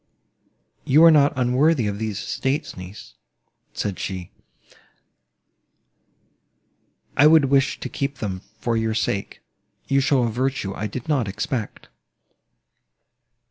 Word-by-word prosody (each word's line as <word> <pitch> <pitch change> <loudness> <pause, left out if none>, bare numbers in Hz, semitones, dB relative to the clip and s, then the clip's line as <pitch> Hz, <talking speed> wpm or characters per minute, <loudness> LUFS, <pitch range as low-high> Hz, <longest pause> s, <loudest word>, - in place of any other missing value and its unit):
"You 150 +5 +5
are 165 - +9
not 145 -2 +5
unworthy 130 +2 +2
of 100 0 -3
these 110 -3 -3
estates, 135 +3 -3
niece," 90 - -11 0.6
said 100 -3 -4
she: 90 -2 -5 2.8
"I 145 - +6
would 155 -4 +5
wish 135 -1 +2
to - - -5
keep 140 0 -4
them 95 -4 -4 0.2
for 115 +1 -1
your 110 -1 -1
sake—you 115 +5 -3
show 135 -2 +2
a 115 - 0
virtue 125 -4 -2
I 105 - -4
did 120 +4 -7
not 140 -8 +1
expect." 105 +3 -4
120 Hz, 115 wpm, -22 LUFS, 105-140 Hz, 2.8 s, are